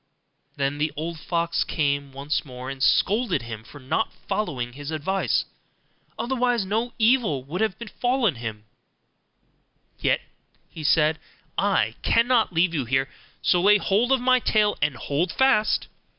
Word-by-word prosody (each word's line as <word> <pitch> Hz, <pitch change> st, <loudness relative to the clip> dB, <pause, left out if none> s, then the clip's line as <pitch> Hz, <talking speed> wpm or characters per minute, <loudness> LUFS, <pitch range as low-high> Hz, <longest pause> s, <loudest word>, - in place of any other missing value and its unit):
Then 140 Hz, +1 st, -1 dB
the 150 Hz, 0 st, 0 dB
old 165 Hz, +1 st, -4 dB
fox 170 Hz, +1 st, 0 dB
came 140 Hz, -3 st, -1 dB
once 140 Hz, +2 st, -2 dB
more, 130 Hz, -1 st, -7 dB
and 135 Hz, -1 st, -8 dB
scolded 210 Hz, -, +2 dB
him 115 Hz, -2 st, -7 dB
for 145 Hz, -, -13 dB
not 140 Hz, +11 st, -1 dB, 0.2 s
following 125 Hz, -, -2 dB
his 145 Hz, +2 st, -7 dB
advice; 160 Hz, +5 st, 0 dB, 0.7 s
otherwise 245 Hz, -4 st, 0 dB
no 225 Hz, +5 st, -1 dB
evil 220 Hz, -, +2 dB
would 155 Hz, +9 st, -4 dB
have 220 Hz, -4 st, 0 dB
befallen 245 Hz, -2 st, 0 dB
him: 110 Hz, -2 st, -6 dB, 1.4 s
'Yet,' -, -, +1 dB, 0.6 s
said 155 Hz, 0 st, +3 dB
he, -, -, -33 dB, 0.4 s
'I -, -, +2 dB
cannot 235 Hz, -2 st, +3 dB
leave 170 Hz, 0 st, +2 dB
you 140 Hz, -6 st, -1 dB
here, 135 Hz, +3 st, 0 dB, 0.3 s
so 175 Hz, -, +3 dB
lay 205 Hz, +3 st, +6 dB
hold 210 Hz, +5 st, +1 dB
of 265 Hz, -, +4 dB
my 255 Hz, +1 st, +4 dB
tail 210 Hz, -3 st, +2 dB
and 150 Hz, -, +1 dB
hold 155 Hz, +8 st, -1 dB
fast. 265 Hz, -4 st, +2 dB
170 Hz, 145 wpm, -24 LUFS, 140-220 Hz, 1.4 s, lay